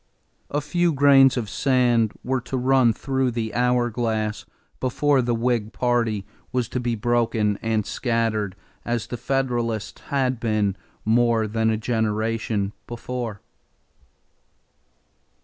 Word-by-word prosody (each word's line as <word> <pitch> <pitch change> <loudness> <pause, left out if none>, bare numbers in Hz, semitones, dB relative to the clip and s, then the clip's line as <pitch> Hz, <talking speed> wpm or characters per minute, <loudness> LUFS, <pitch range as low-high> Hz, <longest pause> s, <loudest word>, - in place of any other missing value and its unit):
A 145 - -1
few 175 +4 +1
grains 135 -2 +6
of 115 -3 -2
sand 120 -3 +2
were 130 0 -1
to 130 +2 -4
run 130 -1 +4
through 130 +2 -1
the 115 -2 -3
hour 125 +1 +2
glass 110 -2 -2 0.3
before 135 +2 +2
the 120 -1 0
Whig 115 -2 0
party 115 -5 0 0.3
was 125 -2 0
to 125 - -2
be 120 -1 -1
broken 110 -2 +1
and 110 -2 0
scattered 115 -5 -1 0.3
as 120 -2 -2
the - - -5
Federalists 120 -4 -2
had 130 -3 0
been 105 -4 0 0.3
more 115 0 +3
than 110 +1 0
a 110 - +1
generation 110 -2 -1
before. 120 -3 -5
120 Hz, 125 wpm, -23 LUFS, 110-125 Hz, 0.3 s, grains